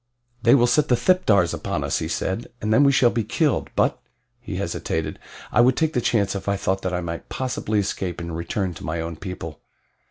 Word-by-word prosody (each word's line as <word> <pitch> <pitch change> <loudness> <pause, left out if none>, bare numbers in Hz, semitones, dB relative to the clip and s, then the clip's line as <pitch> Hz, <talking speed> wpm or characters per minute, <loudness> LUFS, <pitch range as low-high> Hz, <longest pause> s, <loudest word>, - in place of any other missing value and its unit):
"They 120 +3 +6
will 120 -3 +5
set 130 +5 +3
the 125 - +4
thipdars 110 - +3
upon - - -3
us," - - 0
he - - -3
said, 95 +5 -2
"and 110 +1 0
then 140 - +6
we 140 - +6
shall 125 -3 +4
be 115 -1 0
killed; 150 - 0
but - - +1 0.2
" 120 -1 -47
he 105 -5 -6
hesitated 85 -3 -3 0.3
"I - - +5
would 125 +1 +4
take 160 -1 +1
the 125 - +1
chance 105 -4 +1
if 100 0 -4
I 100 - +1
thought 95 0 -1
that 95 - -2
I 90 0 -1
might 85 -1 -6
possibly 125 -4 -2
escape 95 -3 -2
and 85 -1 -5
return 90 +2 -2
to 75 - -11
my 80 +1 -2
own 85 0 -4
people." 80 -3 -7
100 Hz, 225 wpm, -23 LUFS, 90-120 Hz, 0.3 s, They